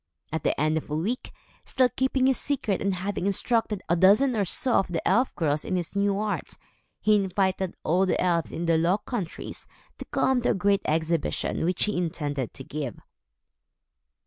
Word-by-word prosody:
At 160 Hz, -, -2 dB
the -, -, 0 dB
end 155 Hz, +1 st, +2 dB
of 155 Hz, -, -5 dB
a 150 Hz, -, -2 dB
week, 210 Hz, +11 st, -2 dB, 0.3 s
still 255 Hz, -1 st, +2 dB
keeping 265 Hz, +1 st, +1 dB
his 265 Hz, -1 st, +3 dB
secret 265 Hz, -9 st, -1 dB
and 195 Hz, -1 st, +1 dB
having 190 Hz, +1 st, -2 dB
instructed 210 Hz, 0 st, 0 dB
a 170 Hz, -, +2 dB
dozen 210 Hz, +9 st, +5 dB
or 205 Hz, -2 st, +1 dB
so 260 Hz, -, +1 dB
of 195 Hz, -, +3 dB
the 175 Hz, -3 st, -3 dB
elf 250 Hz, +2 st, +2 dB
girls 150 Hz, -2 st, 0 dB
in -, -, -2 dB
his 175 Hz, +1 st, -3 dB
new 200 Hz, 0 st, +1 dB
art, 210 Hz, 0 st, -3 dB, 0.4 s
he 215 Hz, -, +3 dB
invited 190 Hz, -2 st, 0 dB
all 185 Hz, +4 st, +2 dB
the -, -, +1 dB
elves 170 Hz, -3 st, +1 dB
in 170 Hz, -, -3 dB
the 165 Hz, -1 st, +3 dB
Low 175 Hz, +4 st, +3 dB
Countries 210 Hz, -6 st, -6 dB, 0.3 s
to -, -, -6 dB
come 260 Hz, -2 st, +1 dB
to -, -, +1 dB
a -, -, +4 dB
great 200 Hz, +1 st, +2 dB
exhibition, 160 Hz, 0 st, 0 dB
which 180 Hz, +1 st, 0 dB
he 210 Hz, -, 0 dB
intended 145 Hz, -7 st, -2 dB
to 135 Hz, -, -8 dB
give. 140 Hz, -4 st, -5 dB
190 Hz, 190 wpm, -26 LUFS, 165-215 Hz, 0.4 s, dozen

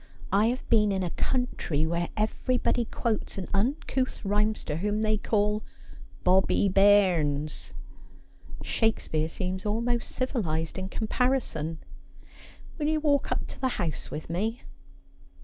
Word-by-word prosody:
I 205 Hz, +3 st, +4 dB
have 250 Hz, +2 st, -2 dB
been 210 Hz, -3 st, +4 dB
in 190 Hz, -1 st, 0 dB
a 175 Hz, -, -2 dB
country 175 Hz, -, 0 dB
where 170 Hz, +1 st, -1 dB
everybody 240 Hz, +2 st, +1 dB
quotes 225 Hz, -2 st, -2 dB
an 190 Hz, -, -4 dB
uncouth 255 Hz, +3 st, -1 dB
rhymester 210 Hz, -5 st, 0 dB
whom 210 Hz, +4 st, 0 dB
they 215 Hz, 0 st, +2 dB
call 210 Hz, 0 st, +1 dB, 0.6 s
Bobbie 190 Hz, +2 st, +4 dB
Bairrns. 180 Hz, -7 st, +3 dB, 0.9 s
Shakespeare 160 Hz, -8 st, 0 dB
seems 185 Hz, +2 st, -3 dB
almost 235 Hz, +3 st, -1 dB
civilised 180 Hz, -, -2 dB
in 190 Hz, 0 st, -4 dB
comparison. 220 Hz, -, 0 dB, 1.0 s
Will 295 Hz, -, 0 dB
you 310 Hz, 0 st, +2 dB
walk 290 Hz, -2 st, +1 dB
up -, -, 0 dB
to -, -, -10 dB
the 260 Hz, -, +2 dB
house 165 Hz, -4 st, -3 dB
with 150 Hz, -, -6 dB
me 215 Hz, +8 st, -2 dB
205 Hz, 125 wpm, -28 LUFS, 175-235 Hz, 1.0 s, I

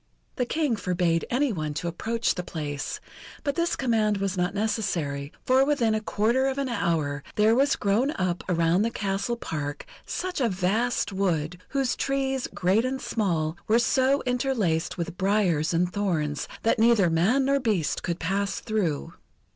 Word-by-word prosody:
The 250 Hz, -, 0 dB
King 300 Hz, -6 st, +1 dB
forbade 175 Hz, -3 st, 0 dB
any 260 Hz, 0 st, +1 dB
one 155 Hz, -4 st, -3 dB
to 165 Hz, +3 st, -3 dB
approach 225 Hz, +7 st, -1 dB
the 180 Hz, -, -3 dB
place, 150 Hz, -4 st, -4 dB, 0.4 s
but 285 Hz, -2 st, 0 dB
this 340 Hz, +2 st, 0 dB
command 220 Hz, -5 st, +1 dB
was 195 Hz, -1 st, -1 dB
not 180 Hz, +2 st, -1 dB
necessary, 180 Hz, -10 st, -1 dB
for 260 Hz, +1 st, +5 dB
within 270 Hz, -6 st, +2 dB
a 215 Hz, -, 0 dB
quarter 230 Hz, +5 st, +1 dB
of 265 Hz, 0 st, -2 dB
an 275 Hz, -2 st, -1 dB
hour 155 Hz, -, 0 dB
there 215 Hz, +1 st, +4 dB
was 275 Hz, +4 st, +3 dB
grown 210 Hz, +7 st, +1 dB
up 180 Hz, -2 st, -1 dB
around 170 Hz, +1 st, +3 dB
the 225 Hz, -, +2 dB
castle 200 Hz, +2 st, -2 dB
park, 145 Hz, -8 st, -4 dB, 0.2 s
such 360 Hz, -5 st, -3 dB
a 240 Hz, -, +3 dB
vast 205 Hz, +5 st, 0 dB
wood, 180 Hz, -3 st, -1 dB
whose 270 Hz, -2 st, 0 dB
trees, 270 Hz, -1 st, -1 dB
great 190 Hz, +5 st, +2 dB
and 260 Hz, +1 st, -2 dB
small, 170 Hz, -11 st, -1 dB
were 220 Hz, -, +4 dB
so 260 Hz, +3 st, +2 dB
interlaced 245 Hz, -10 st, 0 dB
with 170 Hz, 0 st, -4 dB
briars 190 Hz, -6 st, +2 dB
and 175 Hz, +1 st, +1 dB
thorns, 160 Hz, -8 st, -1 dB, 0.2 s
that 225 Hz, -, +2 dB
neither 220 Hz, -6 st, +4 dB
man 210 Hz, +12 st, +3 dB
nor 275 Hz, +1 st, +3 dB
beast 210 Hz, -, 0 dB
could 170 Hz, -2 st, -2 dB
pass 195 Hz, +4 st, -1 dB
through. 200 Hz, -10 st, -2 dB
205 Hz, 165 wpm, -26 LUFS, 170-245 Hz, 0.4 s, for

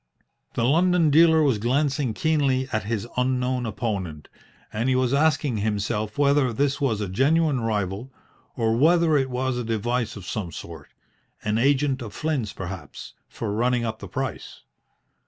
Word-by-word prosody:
The 115 Hz, -, 0 dB
London 170 Hz, +3 st, +3 dB
dealer 160 Hz, +1 st, +6 dB
was 130 Hz, -7 st, +2 dB
glancing 130 Hz, 0 st, 0 dB
keenly 140 Hz, -4 st, +1 dB
at 110 Hz, -2 st, -1 dB
his 110 Hz, 0 st, -2 dB
unknown 125 Hz, -1 st, 0 dB
opponent, 100 Hz, -8 st, -4 dB, 0.4 s
and 115 Hz, +4 st, 0 dB
he 130 Hz, -, +2 dB
was 130 Hz, 0 st, +1 dB
asking 145 Hz, -4 st, +2 dB
himself 105 Hz, 0 st, -2 dB
whether 140 Hz, -2 st, +3 dB
this 140 Hz, +4 st, 0 dB
was 115 Hz, -7 st, 0 dB
a 105 Hz, -, -2 dB
genuine 140 Hz, -, +2 dB
rival, 105 Hz, +2 st, -2 dB, 0.4 s
or 115 Hz, -2 st, +1 dB
whether 165 Hz, +4 st, +4 dB
it 135 Hz, -2 st, +1 dB
was 130 Hz, 0 st, -1 dB
a -, -, -2 dB
device 115 Hz, +1 st, -1 dB
of 100 Hz, -3 st, -9 dB
some 95 Hz, -3 st, -4 dB
sort 80 Hz, -3 st, -9 dB, 0.6 s
an 105 Hz, +1 st, 0 dB
agent 135 Hz, +1 st, +2 dB
of 110 Hz, -4 st, -8 dB
Flynn's 140 Hz, -10 st, -2 dB
perhaps 95 Hz, -6 st, -8 dB, 0.2 s
for 105 Hz, -3 st, -4 dB
running 120 Hz, +2 st, +1 dB
up 110 Hz, -1 st, -4 dB
the -, -, -8 dB
price. 135 Hz, -2 st, -5 dB
125 Hz, 155 wpm, -24 LUFS, 110-140 Hz, 0.6 s, dealer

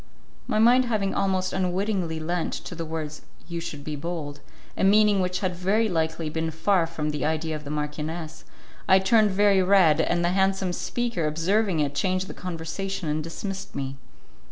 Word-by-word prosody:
My -, -, 0 dB
mind 245 Hz, +4 st, +5 dB
having 210 Hz, -5 st, 0 dB
almost 190 Hz, -1 st, 0 dB
unwittingly 185 Hz, -2 st, -1 dB
lent 170 Hz, +2 st, -2 dB
to -, -, -6 dB
the 165 Hz, -1 st, -5 dB
words 155 Hz, -1 st, -5 dB, 0.3 s
"You 170 Hz, -1 st, -4 dB
should 150 Hz, -3 st, -6 dB
be 150 Hz, 0 st, -4 dB
bold" 145 Hz, -2 st, -5 dB, 0.4 s
a -, -, -2 dB
meaning 205 Hz, 0 st, +5 dB
which 180 Hz, 0 st, -1 dB
had 185 Hz, -2 st, -1 dB
very 200 Hz, +6 st, +1 dB
likely 160 Hz, -3 st, -1 dB
been 160 Hz, +1 st, -2 dB
far 165 Hz, +2 st, +1 dB
from 155 Hz, -2 st, -3 dB
the 150 Hz, -3 st, -3 dB
idea 160 Hz, 0 st, -1 dB
of 150 Hz, -1 st, -7 dB
the -, -, -6 dB
marchioness, 155 Hz, +2 st, -4 dB, 0.4 s
I 190 Hz, -, +7 dB
turned 210 Hz, +3 st, +4 dB
very 200 Hz, 0 st, +4 dB
red, 185 Hz, -5 st, +5 dB
and 175 Hz, 0 st, +1 dB
the -, -, +3 dB
handsome 190 Hz, 0 st, +1 dB
speaker, 235 Hz, -6 st, -2 dB
observing 175 Hz, +3 st, +1 dB
it, 145 Hz, -1 st, 0 dB
changed 185 Hz, +5 st, 0 dB
the -, -, -7 dB
conversation 175 Hz, +1 st, -4 dB
and 155 Hz, +1 st, -1 dB
dismissed 195 Hz, +4 st, -6 dB
me. 135 Hz, 0 st, -3 dB
175 Hz, 180 wpm, -25 LUFS, 160-195 Hz, 0.4 s, I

